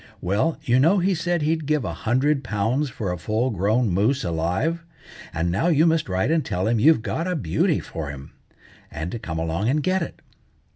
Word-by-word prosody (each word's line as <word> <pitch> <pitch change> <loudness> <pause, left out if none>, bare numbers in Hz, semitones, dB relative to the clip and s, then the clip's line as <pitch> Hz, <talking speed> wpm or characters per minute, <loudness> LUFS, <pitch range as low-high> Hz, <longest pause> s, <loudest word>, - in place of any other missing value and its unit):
Well, 100 - 0
you 125 -3 +3
know 165 +9 +4
he 190 +1 +2
said 175 -1 -1
he'd 160 -1 0
give 150 -5 +1
a 85 - -3
hundred 135 - +1
pounds 115 +8 0
for 105 -6 -4
a 90 - -4
full 110 +8 0
grown 105 +4 +1
moose 110 +10 +1
alive; 90 - -1 0.5
and 85 +1 -1
now 100 - +1
you 160 -2 +4
must 160 -7 +1
write 95 +9 0
and 165 -2 +2
tell 90 +1 -2
him 115 0 +2
you've 150 -1 +5
got 155 - -2
a 180 - -1
beauty 85 - +1
for 80 -3 -6
him, 70 -1 -9 0.6
and 80 +3 -5
to 120 - -5
come 80 -6 -5
along 80 +7 -1
and 150 +2 +1
get 185 +3 +1
it." 170 - -5
120 Hz, 205 wpm, -23 LUFS, -, 0.6 s, you've